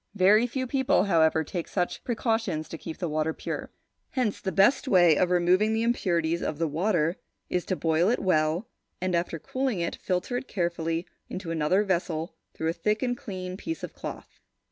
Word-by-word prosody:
Very 210 +5 +5
few 260 +2 -2
people, 265 -3 +2
however, 160 -4 +3
take 170 +2 -4
such 180 -2 -2
precautions 225 -9 -1
to 165 - -6
keep 160 - -7
the 175 - -2
water 155 +1 0
pure. - - -5 0.4
Hence 245 -6 -1
the 190 - -2
best 200 - +4
way 175 -7 +6
of 180 +4 +2
removing 180 +5 +3
the 225 +1 +1
impurities 170 -8 +1
of 150 - -2
the 165 +1 0
water 170 +1 +1 0.3
is 180 - 0
to 185 - -1
boil 165 +2 +2
it 245 - +2
well, 165 +2 +1 0.3
and, 185 0 -1
after 170 -1 0
cooling 255 - -2
it, 170 - -1
filter 185 +7 -1
it 255 - -5
carefully 170 -2 -1 0.2
into 185 -3 -5
another 165 +5 +2
vessel 170 -4 -1 0.2
through 160 - -1
a - - 0
thick 210 +5 0
and 245 -1 0
clean 185 -7 -6
piece 325 +9 -5
of - - -5
cloth. - - -8
180 Hz, 190 wpm, -27 LUFS, 165-215 Hz, 0.4 s, way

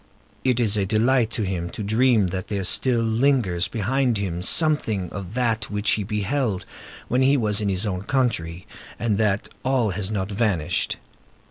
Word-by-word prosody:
It 125 -2 +1
is 110 -3 +2
a 100 - +1
delight 115 +3 +2
to 110 - -1
him 90 -3 -3
to 105 - -6
dream 110 +1 +3
that 95 +3 -4
there 100 -2 -2
still 120 +5 +2
lingers 110 -6 +1
behind 120 +2 0
him 90 -4 -3
something 110 - +2
of 100 +1 -7
that 115 -3 0
which 105 0 0
he 105 - +1
beheld 105 +1 -2 0.4
when 125 +2 +1
he 135 +2 +4
was 105 -3 +1
in 100 - 0
his 95 +2 -1
own 95 -3 -2
country, 95 -11 -1 0.3
and 105 -2 0
that 105 -2 +1 0.2
all 130 -5 +1
has 95 +1 -3
not 100 -2 -3
vanished. 95 -6 0
105 Hz, 170 wpm, -23 LUFS, 95-120 Hz, 0.4 s, he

